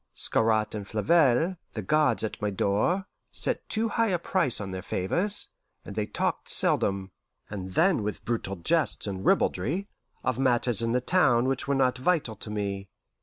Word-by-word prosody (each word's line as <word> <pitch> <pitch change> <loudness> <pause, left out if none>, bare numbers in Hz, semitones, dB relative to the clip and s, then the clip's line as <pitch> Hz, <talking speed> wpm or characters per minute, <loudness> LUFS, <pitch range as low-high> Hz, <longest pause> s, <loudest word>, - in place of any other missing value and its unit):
Scarrat 110 -1 +2
and 105 -2 -5
Flavelle, 160 - +3 0.2
the 110 - -3
guards 145 +1 +2
at 110 - -4
my 105 - 0
door, 105 - 0 0.3
set - - -1
too 225 +1 0
high 230 0 +1
a 185 -4 +1
price 170 -6 0
on 100 -2 -5
their 95 0 -5
favours, 180 - -1 0.4
and 100 - -8
they 105 -1 -1
talked - - -2
seldom, 95 -1 +1 0.4
and 95 -2 -6
then 175 - +3
with 105 0 -4
brutal 110 -4 -2
jests 155 - 0
and 95 -2 -4
ribaldry, 155 - +1 0.4
of 130 -1 -1
matters 120 -4 +3
in 115 0 0
the 125 - +2
town 125 -6 +3
which 135 0 -1
were 140 - +1
not 130 -2 +2
vital 145 -6 +1
to 105 - -7
me. 100 -2 -3
120 Hz, 170 wpm, -27 LUFS, 100-160 Hz, 0.4 s, Flavelle